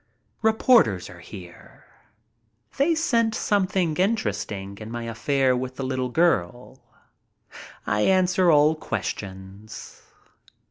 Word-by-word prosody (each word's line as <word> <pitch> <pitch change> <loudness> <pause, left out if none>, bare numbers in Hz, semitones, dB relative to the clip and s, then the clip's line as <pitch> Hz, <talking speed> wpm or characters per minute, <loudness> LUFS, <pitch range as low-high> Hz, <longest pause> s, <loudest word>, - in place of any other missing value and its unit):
Reporters 220 - +3
are 90 - -13
here. 85 0 -13 0.9
They 315 +5 +3
scent 230 -8 +1
something 185 -5 0
interesting 105 - -2
in 110 - -7
my 120 0 -5
affair 130 +3 +1
with 130 +1 -4
the 135 - -5
little 130 -1 -2
girl. 125 - 0 1.1
I 105 +1 0
answer 185 - +3
all 150 0 +5
questions. 100 -7 -7
130 Hz, 100 wpm, -24 LUFS, -, 1.1 s, all